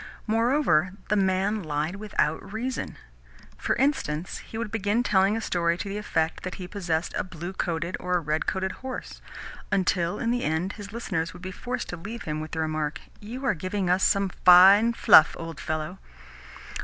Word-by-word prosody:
Moreover, 225 - +2 0.2
the 210 - +3
man 195 +2 +1
lied 155 +2 -2
without 195 -4 -1
reason. 240 +4 -4 0.6
For - - 0
instance, 235 - -1
he 225 - -9
would 230 -2 -4
begin 220 +2 0
telling 200 -1 +3
a - - -3
story 170 -4 0
to 195 - -5
the 200 +1 -3
effect 160 -6 -1
that 185 - -5
he 180 - -7
possessed 175 -4 -2
a - - 0
blue 175 0 -7
coated 170 -1 -2
or 180 0 0
a - - 0
red 155 -1 -2
coated 190 0 -1
horse; 260 0 -7 0.5
until, 180 -2 +1
in 235 - -1
the 245 0 0
end, 160 +5 -1
his 205 -2 -9
listeners 185 -7 -3
would 180 - -13
be 185 - -5
forced 250 +6 -4
to 175 - -5
leave 220 +8 -7
him 155 0 -3
with 155 - -6
the 160 - -5
remark, 155 -1 -2 0.2
"You 245 +6 -7
are - - +3
giving 185 +2 -2
us 185 +1 +2
some 200 -1 +3
fine 195 +6 +8
stuff, 155 - +7
old 165 -1 -7
fellow!" 155 +4 -4
185 Hz, 185 wpm, -26 LUFS, 165-210 Hz, 0.6 s, fine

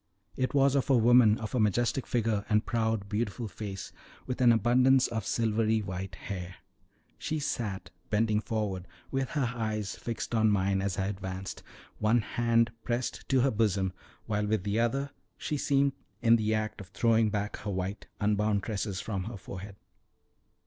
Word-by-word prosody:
It 130 +2 -1
was 135 -1 +5
of 140 -1 +1
a 135 - +6
woman 115 -2 +6
of 110 - -6
a 125 - +1
majestic 120 +4 +1
figure 110 -4 0
and 105 0 +3
proud, 110 -4 0
beautiful 110 +2 -2
face, 100 0 -6 0.3
with 125 0 -3
an 120 -1 +7
abundance 125 +4 +4
of 110 -4 -3
silvery 110 -1 +1
white 95 0 -5
hair. 90 -2 -6 0.6
She 155 - -2
sat 110 -9 -3 0.2
bending 110 0 +2
forward 105 -5 -3 0.2
with 135 -1 -1
her 130 -5 0
eyes 110 -3 -2
fixed 115 0 -5
on 110 -1 +4
mine 100 -1 +2
as 95 -1 -2
I 95 - 0
advanced, 95 -1 -5 0.4
one 110 +2 +3
hand 115 +1 +2
pressed 120 +1 -3
to 130 -2 +4
her 135 +1 +3
bosom, 100 -4 +1 0.3
while 105 -1 -1
with 105 -3 0
the 105 +2 0
other 135 +4 0 0.3
she 150 - -3
seemed 140 0 +2 0.3
in 115 0 +5
the 110 -1 0
act 110 -1 -3
of 95 - -10
throwing 115 +2 +2
back 105 0 -2
her 105 - -5
white 95 +1 -3
unbound 105 0 +1
tresses 100 -3 -3
from 100 -4 -3
her 115 -2 -6
forehead. 95 +1 -8
110 Hz, 170 wpm, -30 LUFS, 100-120 Hz, 0.6 s, an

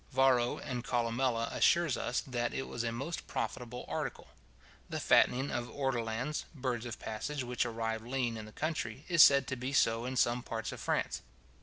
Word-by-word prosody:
Varro 125 -2 +3
and 125 -2 -4
Columella 120 -1 0
assure 170 0 +4
us, 125 -4 -1
that 120 -2 -2
it 135 - -3
was 120 - -3
a 115 - -1
most 140 +9 -4
profitable 120 +2 -4
article. - - -4 0.6
The - - -3
fattening 130 +3 +4
of 120 0 -2
ortolans, 130 +1 -2
birds 125 -4 -2
of 120 - -5
passage 130 +6 -4
which 125 0 -1
arrive 115 -1 -2
lean 120 0 -1
in 110 -1 -6
the - - -11
country, 140 -3 -3
is 170 -3 +6
said 140 -2 +8
to 130 - -1
be 130 +2 -4
so 115 -3 +3
in 130 +1 -3
some 120 0 +3
parts 115 -1 -4
of - - -7
France. - - -1
120 Hz, 180 wpm, -33 LUFS, 115-135 Hz, 0.6 s, said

